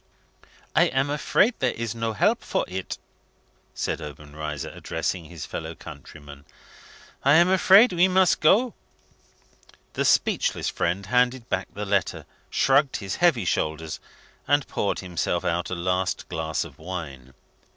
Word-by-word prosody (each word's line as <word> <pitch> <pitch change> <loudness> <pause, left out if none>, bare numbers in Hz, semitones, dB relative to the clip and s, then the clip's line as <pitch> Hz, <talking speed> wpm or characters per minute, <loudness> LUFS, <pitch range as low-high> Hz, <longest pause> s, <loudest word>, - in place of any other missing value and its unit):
"I - - +6
am 135 +2 0
afraid 150 - +2
there 130 -2 0
is 115 -1 -3
no 115 -1 -2
help 105 - +2
for - - -1
it?" 95 0 -5 0.8
said - - -2
Obenreizer, 75 0 -6
addressing 80 +2 -3
his 85 -1 -8
fellow - - -6
countryman. 70 -2 -12 0.8
"I 140 +2 +5
am 170 +2 +6
afraid 190 +4 +6
we 175 +2 +4
must 185 0 +3
go." 220 +10 +4 1.2
The - - -1
speechless - - +2
friend 90 +4 -1
handed 125 +2 +1
back - - -1
the 105 +1 -4
letter, 100 -2 -1 0.2
shrugged 135 +1 +3
his 95 -2 -5
heavy 160 - +3
shoulders, 80 -1 -2 0.5
and 145 -1 +2
poured 100 - -2
himself 90 -4 -2
out 85 +1 -1
a 95 - -2
last 90 +1 -1
glass 80 -1 -2
of 80 -5 -13
wine. 75 -7 -7
100 Hz, 140 wpm, -25 LUFS, -, 1.2 s, I